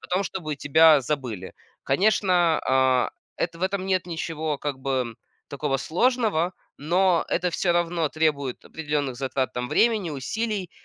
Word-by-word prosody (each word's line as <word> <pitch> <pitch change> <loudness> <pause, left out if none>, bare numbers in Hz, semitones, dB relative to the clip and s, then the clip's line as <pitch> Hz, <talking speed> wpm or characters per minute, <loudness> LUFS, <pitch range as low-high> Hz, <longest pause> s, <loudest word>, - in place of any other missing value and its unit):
о - - -12
том, 185 +2 0
чтобы 155 -7 -4
тебя 150 0 +5
забыли. 120 -9 -4 0.3
Конечно, 180 0 +2
а, 130 -1 +3 0.3
это 165 -1 -3
в 180 - -8
этом 190 0 -1
нет 185 -2 0
ничего, 160 -2 -3
как 145 -2 -4
бы, 130 -3 -2 0.3
такого 140 -1 -1
сложного, 185 - +1 0.2
но 175 +3 +2
это 180 +1 0
всё 175 +1 +1
равно 170 -2 0
требует 145 -5 -1
определенных 145 -5 -3
затрат 130 0 -2
там 125 0 -3
времени, 220 - +2
усилий, 195 - -3
160 Hz, 145 wpm, -25 LUFS, 135-180 Hz, 0.3 s, тебя